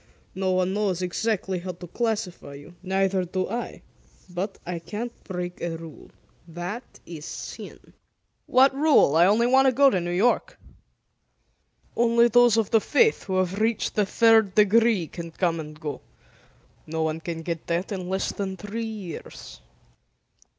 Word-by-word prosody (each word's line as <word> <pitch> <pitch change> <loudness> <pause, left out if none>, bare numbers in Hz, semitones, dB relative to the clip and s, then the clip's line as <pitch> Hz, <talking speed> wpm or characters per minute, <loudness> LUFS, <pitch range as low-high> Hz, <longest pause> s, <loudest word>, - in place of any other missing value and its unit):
No 190 0 -1
one 185 0 +1
knows 195 -3 -1
exactly 190 0 -1
how 180 +1 -5
to 175 +1 -10
classify 205 -7 -3
you. 145 +5 -12
Neither 190 0 0
do 185 +1 -2
I. 235 +4 -5 0.4
But, 185 +3 -4
I 175 -1 -4
can't 215 +8 -6
break 180 -1 -5
a 165 -1 -3
rule. 160 -2 -12 0.4
That 175 +8 -5 0.2
is 160 -3 -9
sin." - - -9 0.5
"What 265 +2 +5
rule? 285 - +4
I 170 +3 +6
want 245 +5 +4
to - - +5
go 275 +2 +5
to 185 - 0
New 175 - -4
York." 235 - +1 1.4
"Only 235 0 +4
those 240 -1 +5
of 225 -3 0
the 225 - +4
Faith 450 - +2
who 190 -2 -1
have 185 +2 0
reached 225 0 0
the 210 -2 +1
third 220 -3 +4
degree 215 -2 +4
can 170 +1 -8
come 165 0 -1
and 155 -1 -8
go. 150 -2 -5 0.9
No 160 +1 -2
one 160 0 -1
can 165 0 -6
get 165 -1 -5
that 170 +4 -2
in 185 -3 -4
less 190 +1 -1
than 190 -2 -4
three 205 +5 -5
years." 195 - -8
190 Hz, 155 wpm, -25 LUFS, 175-225 Hz, 1.4 s, I